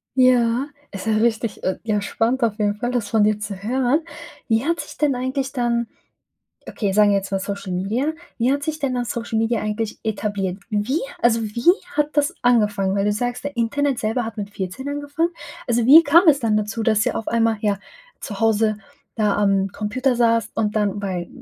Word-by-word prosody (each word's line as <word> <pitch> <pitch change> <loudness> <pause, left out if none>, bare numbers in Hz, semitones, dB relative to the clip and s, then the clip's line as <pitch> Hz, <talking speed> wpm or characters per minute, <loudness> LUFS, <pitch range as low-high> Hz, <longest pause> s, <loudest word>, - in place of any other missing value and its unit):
Ja, 250 0 +3 0.2
ist 195 +2 -7
ja 220 - +2
richtig, 225 -1 0
äh, 185 - -1
ja, 210 -2 0
spannend 235 +5 0
auf 220 -2 +1
jeden 205 0 +1
Fall, 240 +4 -3
das 235 -5 -1
von 220 -1 +3
dir 210 0 +2
zu 205 -1 -5
hören. 260 +6 +1 0.5
Wie 225 +4 +2
hat 335 +1 0
sich - - -11
denn 290 -4 +2
eigentlich 260 +2 -2
dann 235 -2 0 0.8
okay, 200 -3 -2
sagen 210 0 +5
wir 200 - +3
jetzt 195 0 -3
mal 195 - +1
Social 200 -1 -5
Media, 225 - -1 0.2
wie 250 +3 +2
hat 285 0 -1
sich 310 +1 -3
denn 275 -3 -1
dann 245 -1 -2
Social 230 0 -3
Media 225 0 +1
eigentlich 215 +1 -3
etabliert? 205 -3 -2
Wie 215 +9 0 0.2
also 230 -1 +3
wie 235 +10 +3 0.2
hat 295 0 +2
das 290 +5 +1
angefangen? 210 -5 +2
Weil 200 0 +1
du 210 - +2
sagst, 245 +4 -3
der 285 -3 -5
Internet 270 +3 0
selber 225 +2 -1
hat 225 - -6
mit 205 -1 -5
14 200 +8 -5
angefangen? 290 +4 -1 0.4
Also 240 -1 +1
wie 315 +5 +9
kam 335 +4 +5
es 285 -2 +5
dann 220 -2 +1
dazu, 215 +2 -3
dass 215 -1 +2
ihr - - 0
auf 225 - -4
einmal, 230 -1 +2
ja, 205 -2 +1 0.4
zu 205 -1 -7
Hause 220 -1 +2 0.4
da 210 -3 +1
am 195 -1 +2
Computer 255 +7 -1
saßt 230 -2 +2
und 215 -1 0
dann 205 -1 0
bei, 180 -3 -3
225 Hz, 205 wpm, -21 LUFS, 210-255 Hz, 0.8 s, wie